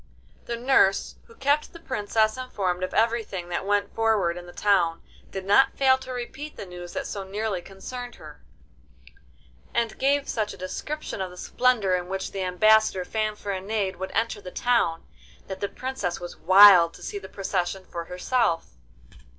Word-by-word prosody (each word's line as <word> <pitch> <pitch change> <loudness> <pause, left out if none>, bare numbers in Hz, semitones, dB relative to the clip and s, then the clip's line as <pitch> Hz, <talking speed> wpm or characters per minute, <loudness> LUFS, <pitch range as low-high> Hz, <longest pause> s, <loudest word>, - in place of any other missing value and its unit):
The 235 - -3
nurse, 235 -6 +3
who 230 - -18
kept 285 +2 +1
the 335 - -11
Princess 215 -5 0
informed 195 -8 -2
of 185 - -2
everything 225 -6 0
that 175 +2 -3
went 205 0 +1
forward 215 -6 +1
in 175 0 -9
the - - -10
town, 175 -5 +1 0.3
did 190 -1 -6
not 270 +8 +4
fail 260 -1 +4
to 260 0 -8
repeat 265 +4 -6
the - - -6
news 175 -1 -9
that - - -3
so 200 - -5
nearly 200 -1 -3
concerned 245 +7 -8
her, 150 -1 -13 1.3
and 235 -1 0
gave 280 +1 +2
such 215 -2 -2
a - - -17
description 245 +6 -5
of 185 - -3
the 180 - -13
splendour 230 -3 +1
in 180 -1 -1
which 190 0 -3
the 195 - -4
ambassador 190 +1 +3
Fanfaronade 205 -2 -2
would 190 +1 -4
enter 225 -1 0
the 180 - -8
town, 230 -6 +1 0.4
that 190 -1 -7
the 200 - -2
Princess 255 -9 -4
was 175 - -7
wild 185 -2 +7
to - - -13
see 205 - -4
the 190 -1 -11
procession 190 -1 -2
for 170 -1 -6
herself. 180 -1 0
200 Hz, 170 wpm, -25 LUFS, 185-235 Hz, 1.3 s, wild